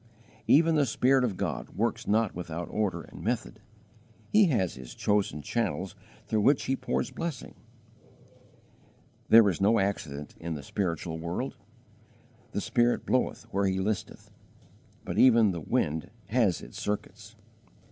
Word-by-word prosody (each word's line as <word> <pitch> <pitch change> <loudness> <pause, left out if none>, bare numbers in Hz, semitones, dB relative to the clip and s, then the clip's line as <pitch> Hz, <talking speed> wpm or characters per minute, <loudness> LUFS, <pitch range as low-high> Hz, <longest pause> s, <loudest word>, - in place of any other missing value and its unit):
Even 165 +3 +5
the 145 -3 +3
Spirit 130 +3 +3
of 105 -7 -1
God - - -3
works 115 +1 -1
not 110 0 +2
without 85 -1 -5
order 105 -3 -1
and - - -12
method; - - -3 0.7
He 210 -2 +6
has 110 - +1
His 65 -2 -10
chosen 100 -8 0
channels - - -2 0.3
through 110 -1 0
which 135 +6 +4
He 135 - 0
pours - - -2
blessing. 165 -6 -5 1.8
There 115 -2 +8
is 90 -4 -1
no 110 +4 +4
accident 80 -8 -2
in 85 -1 -4
the 70 - -7
spiritual 85 -1 -3
world. 85 +2 -3 1.0
"The - - -2
Spirit 120 0 +1
bloweth 130 - 0
where 100 0 +2
He 95 0 0
listeth," 100 +2 -3 0.7
but - - -2
even 115 -5 +6
the 85 -2 -5
wind 75 +2 -1 0.2
has 110 -6 +2
its - - -9
circuits. 105 0 -5
105 Hz, 140 wpm, -28 LUFS, 85-120 Hz, 1.8 s, There